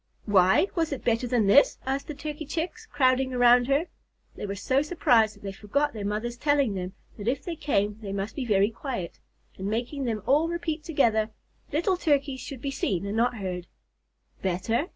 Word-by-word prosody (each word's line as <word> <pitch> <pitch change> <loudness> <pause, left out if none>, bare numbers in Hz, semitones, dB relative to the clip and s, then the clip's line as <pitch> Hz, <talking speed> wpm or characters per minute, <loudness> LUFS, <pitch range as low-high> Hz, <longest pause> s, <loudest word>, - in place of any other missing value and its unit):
"Why! 190 - +5
Was 325 -3 0
it 280 - -4
better 235 +1 +1
than 235 -3 +2
this?" 205 +9 +5
asked 270 +1 -2
the 300 - -5
Turkey 300 +1 -6
Chicks, 365 +9 -4
crowding 260 -5 +2
around 245 0 +5
her. 280 +4 +2 0.5
They - - -5
were 200 - -3
so 260 +7 +1
surprised 240 -9 +3
that 205 - -19
they 195 - -4
forgot 280 +10 -1
their 215 -3 -5
mothers' 220 +4 -2
telling 285 -4 +2
them 185 -1 -4 0.3
that 205 - -6
if 265 +3 0
they 345 - -4
came 210 -9 0
they 200 -2 -5
must 200 +2 -3
be 275 - -2
very 205 -2 +3
quiet, 230 - -5 0.4
and 190 - -3
making 240 +6 -2
them 220 -4 -2
all 300 +4 +3
repeat 335 -2 -3
together, 225 -9 +2 0.4
"Little 345 +5 +1
Turkeys 280 -5 +1
should 260 -2 -8
be 280 - -1
seen 200 -9 -1
and 200 +1 -3
not 240 +1 +1
heard." 180 -3 -4 0.7
"Better? 195 - 0
245 Hz, 195 wpm, -27 LUFS, 205-290 Hz, 0.7 s, Why